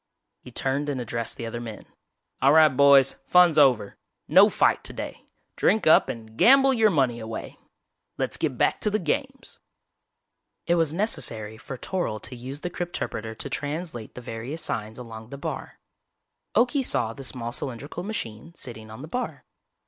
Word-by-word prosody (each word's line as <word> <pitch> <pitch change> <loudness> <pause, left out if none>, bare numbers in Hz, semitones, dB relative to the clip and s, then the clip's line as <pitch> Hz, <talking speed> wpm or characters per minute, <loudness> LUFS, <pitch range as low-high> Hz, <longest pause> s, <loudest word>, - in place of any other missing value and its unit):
He - - -13
turned 135 +4 -1
and 135 -3 -2
addressed 115 -1 -4
the 115 - -5
other 120 +1 -5
men. 115 -3 -8 0.6
"All 140 +2 +5
right, 155 -1 +7
boys, 140 -1 +6
fun's 175 -4 +6
over! 125 -8 +3 0.3
No - - +7
fight - - +2
today! - - -6 0.3
Drink 210 +1 +2
up 155 - +6
and 110 -1 -7
gamble 270 +2 +7
your 225 -3 +4
money 130 - +1
away. 110 0 -7 0.6
Let's - - -2
get - - -2
back - - +1
to - - +2
the 210 - +1
games." 265 - -3 1.1
It 170 - +2
was 165 -3 +2
necessary 115 - -2
for 130 +3 -8
Toryl 175 - -3
to 125 - -5
use 130 +4 -7
the 175 - -4
crypterpreter 115 -11 -4
to - - -4
translate 145 -5 -5
the 125 - -7
various 120 +7 -5
signs 110 +1 -4
along 110 -2 -9
the 140 - -7
bar. 140 - -6 0.8
Okie 260 +3 +3
saw 115 - 0
the 135 - -10
small 120 -1 -3
cylindrical 135 +6 -5
machine 170 - -6
sitting 110 -6 -9
on 110 +5 -9
the - - -7
bar. 250 +10 -4
135 Hz, 165 wpm, -25 LUFS, 115-170 Hz, 1.1 s, right